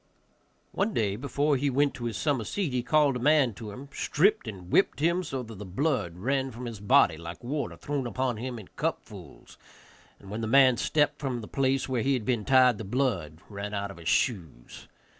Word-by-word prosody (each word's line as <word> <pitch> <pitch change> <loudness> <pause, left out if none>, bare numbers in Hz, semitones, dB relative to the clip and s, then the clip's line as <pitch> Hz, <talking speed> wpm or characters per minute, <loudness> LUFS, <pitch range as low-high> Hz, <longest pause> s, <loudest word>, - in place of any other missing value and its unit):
One 205 +2 -1
day, 100 -3 +1
before 140 +4 0
he 140 +2 0
went 140 +2 +2
to 120 - -6
his 115 -3 -3
summer 145 -6 0
seat, 170 - -2
he 125 - +1
called 145 0 +3
a - - -6
man 140 -2 +3
to 105 +2 -8
him, 130 +7 -9
stripped 200 - +1
and 95 -4 -8
whipped 195 - +3
him 170 +4 +2
so 135 -5 -4
that 115 -1 -10
the - - -6
blood 100 - -1
ran 135 +6 0
from 125 0 -8
his 115 -3 -6
body 105 - +4
like 85 +5 -9
water 140 +4 -3
thrown 140 -3 -3
upon 125 -1 -1
him 125 +2 -5
in 105 -5 -11
cupfuls, - - -6 0.6
and 100 - -12
when 110 +2 -4
the 110 - -2
man 130 0 +5
stepped 150 +1 +1
from 130 -4 -3
the 105 - -9
place 135 0 0
where 130 -3 -1
he 135 +4 +1
had 115 -4 -4
been 115 -4 0
tied, 130 -2 +5
the - - -4
blood 95 - -2
ran 100 0 -5
out 100 0 -3
of 95 - -12
his 85 0 -4
shoes. 85 - -2
125 Hz, 215 wpm, -28 LUFS, 105-140 Hz, 0.6 s, man